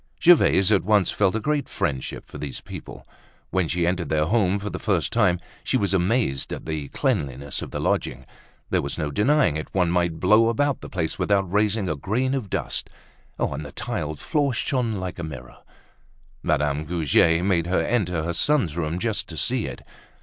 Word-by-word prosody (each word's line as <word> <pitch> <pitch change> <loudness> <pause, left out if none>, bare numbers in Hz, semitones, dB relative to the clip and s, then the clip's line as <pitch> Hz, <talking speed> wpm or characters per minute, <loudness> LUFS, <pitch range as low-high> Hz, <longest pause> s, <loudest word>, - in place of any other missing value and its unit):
Gervaise 110 - +5
at 100 - +4
once 105 -1 +3
felt 100 -1 +2
a - - +1
great 150 +5 -1
friendship 65 -2 -3
for 75 - -10
these 70 -2 -5
people. - - -10 0.5
When 95 -3 +1
she 85 +2 0
entered 85 -3 -1
their 75 0 +2
home 100 0 +2
for 100 0 -5
the - - -5
first 95 -7 0
time, 95 -7 +3 0.2
she - - +1
was 100 -5 0
amazed 95 - +1
at - - -5
the 80 -3 -3
cleanliness 70 - -2
of - - -6
the - - -4
lodging. 65 +2 -1 0.5
There - - +2
was - - -3
no 75 -1 -2
denying 130 - +3
it, 80 - -5
one 90 -3 +2
might 85 -2 0
blow 110 +5 +5
about 140 +4 0
the - - -8
place 80 -4 -3
without 95 -3 +1
raising 105 -1 +2
a 75 - -1
grain 120 - -1
of 125 -8 -3
dust; - - -2 0.5
and 75 - -2
the 70 - -8
tiled 75 -1 -4
floor 140 - 0
shone 120 -3 0
like 95 -1 -5
a - - -4
mirror. 70 -6 -8 0.8
Madame 75 0 0
Goujet 80 +1 +3
made 85 -4 +2
her 95 - +2
enter 90 -9 0
her 85 +1 -2
son's 115 - +1
room, 85 0 -2
just 105 0 -2
to 80 - -8
see 125 +3 0
it. - - -8
90 Hz, 195 wpm, -24 LUFS, 80-110 Hz, 0.8 s, Gervaise